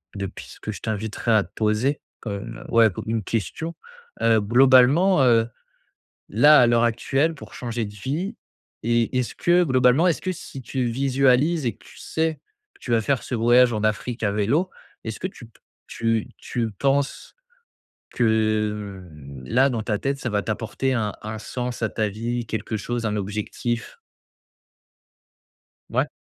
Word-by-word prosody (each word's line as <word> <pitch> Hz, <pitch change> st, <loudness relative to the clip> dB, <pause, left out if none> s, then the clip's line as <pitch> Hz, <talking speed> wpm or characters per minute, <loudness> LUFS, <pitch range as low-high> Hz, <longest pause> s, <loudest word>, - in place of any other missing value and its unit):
de 100 Hz, -1 st, -3 dB
pistes -, -, -11 dB
que 110 Hz, -, -4 dB
je 100 Hz, -, -8 dB
t'inviterais 110 Hz, +1 st, -2 dB
à 105 Hz, -3 st, +4 dB
te 85 Hz, -, -18 dB
poser 110 Hz, +6 st, +1 dB, 0.2 s
comme, 105 Hz, +1 st, -6 dB
heu -, -, -11 dB
ouais, 115 Hz, -1 st, +6 dB
comme -, -, -7 dB
une 110 Hz, -1 st, -1 dB
question, 115 Hz, -, -3 dB, 0.5 s
heu, 115 Hz, -1 st, +4 dB
globalement, 130 Hz, -, +5 dB
heu, 115 Hz, -3 st, +4 dB, 0.8 s
là, 145 Hz, +8 st, +6 dB
à 125 Hz, -, +6 dB
l'heure 120 Hz, 0 st, +3 dB
actuelle, 135 Hz, +7 st, +1 dB
pour 145 Hz, -, -12 dB
changer 120 Hz, -2 st, -3 dB
de 100 Hz, -, -7 dB
vie, 155 Hz, -, -3 dB, 0.5 s
est 115 Hz, +1 st, +1 dB
est-ce 125 Hz, -2 st, -1 dB
que, 175 Hz, +1 st, +3 dB
globalement, 130 Hz, +3 st, +4 dB
est-ce 170 Hz, -, 0 dB
que 185 Hz, -, -1 dB
si 135 Hz, -6 st, -9 dB
tu 125 Hz, +3 st, -2 dB
visualises 135 Hz, +4 st, +2 dB
et 115 Hz, -, 0 dB
que -, -, -23 dB
tu -, -, -15 dB
sais 160 Hz, 0 st, -1 dB, 0.4 s
que -, -, -25 dB
tu -, -, -7 dB
vas 115 Hz, -, +4 dB
faire 135 Hz, +2 st, 0 dB
ce -, -, -4 dB
voyage 120 Hz, +2 st, +5 dB
en 105 Hz, -2 st, -2 dB
Afrique 110 Hz, +3 st, -1 dB
à 100 Hz, -, +2 dB
vélo, 135 Hz, -, +1 dB, 0.3 s
est-ce 110 Hz, -1 st, -5 dB
que -, -, -1 dB
tu 130 Hz, -10 st, -13 dB
p 115 Hz, -, -25 dB, 0.3 s
tu 115 Hz, -1 st, -1 dB
tu 115 Hz, -2 st, -3 dB
penses 140 Hz, +6 st, -1 dB, 0.8 s
que 105 Hz, -3 st, 0 dB, 0.4 s
là, 130 Hz, -, +3 dB
dans 115 Hz, -3 st, -2 dB
ta 105 Hz, -1 st, -1 dB
tête, 140 Hz, +3 st, -2 dB
ça -, -, -2 dB
va 105 Hz, -1 st, 0 dB
t'apporter 115 Hz, +5 st, -2 dB
un 105 Hz, -4 st, -1 dB
un 110 Hz, +1 st, -5 dB
sens 120 Hz, +2 st, -5 dB
à 110 Hz, -, +2 dB
ta 110 Hz, -1 st, -1 dB
vie, 115 Hz, +3 st, -3 dB
quelque 110 Hz, 0 st, -3 dB
chose, 120 Hz, +2 st, -3 dB
un 105 Hz, -, -1 dB
objectif? 110 Hz, -, -4 dB, 1.9 s
Ouais. -, -, +1 dB
115 Hz, 170 wpm, -23 LUFS, 110-135 Hz, 1.9 s, ouais